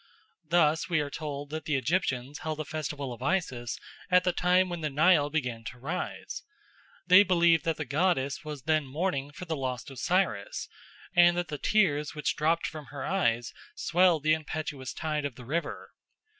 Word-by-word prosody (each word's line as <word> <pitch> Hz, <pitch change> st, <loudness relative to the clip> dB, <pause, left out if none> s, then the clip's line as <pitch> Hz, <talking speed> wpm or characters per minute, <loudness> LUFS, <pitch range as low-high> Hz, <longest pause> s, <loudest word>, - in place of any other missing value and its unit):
Thus 165 Hz, -1 st, +3 dB
we 170 Hz, -3 st, +2 dB
are 145 Hz, -1 st, -2 dB
told 145 Hz, -2 st, -5 dB
that 155 Hz, 0 st, -5 dB
the 150 Hz, -, 0 dB
Egyptians 135 Hz, -2 st, -1 dB
held 155 Hz, -1 st, -4 dB
a 155 Hz, -, -3 dB
festival 145 Hz, -4 st, -4 dB
of 120 Hz, -, -12 dB
Isis 130 Hz, -7 st, -1 dB, 0.3 s
at 180 Hz, -1 st, +5 dB
the 180 Hz, -, +2 dB
time 180 Hz, +1 st, +3 dB
when 175 Hz, -2 st, -5 dB
the 155 Hz, -, -1 dB
Nile 150 Hz, +1 st, +4 dB
began 125 Hz, -7 st, -2 dB
to 125 Hz, -, -7 dB
rise. 160 Hz, +9 st, -4 dB, 0.6 s
They 185 Hz, +2 st, +8 dB
believed 170 Hz, -4 st, +4 dB
that 165 Hz, -1 st, 0 dB
the 155 Hz, -, -3 dB
goddess 145 Hz, 0 st, 0 dB
was 150 Hz, -4 st, -7 dB
then 155 Hz, -2 st, +1 dB
mourning 145 Hz, -1 st, -2 dB
for 165 Hz, +5 st, -8 dB
the 160 Hz, -2 st, -2 dB
lost 130 Hz, -1 st, -4 dB
Osiris, 185 Hz, -, -1 dB, 0.5 s
and 175 Hz, 0 st, +6 dB
that 175 Hz, -2 st, -2 dB
the 150 Hz, -2 st, -4 dB
tears 150 Hz, -9 st, +2 dB
which 150 Hz, -, -1 dB
dropped 165 Hz, +2 st, +1 dB
from 155 Hz, -2 st, -6 dB
her 140 Hz, -2 st, -6 dB
eyes 120 Hz, -12 st, 0 dB, 0.2 s
swelled 175 Hz, -3 st, +3 dB
the 155 Hz, 0 st, +4 dB
impetuous 150 Hz, -4 st, -4 dB
tide 155 Hz, -2 st, -2 dB
of 140 Hz, -4 st, -4 dB
the 125 Hz, -, -11 dB
river. 165 Hz, +7 st, -3 dB
155 Hz, 180 wpm, -29 LUFS, 140-175 Hz, 0.6 s, They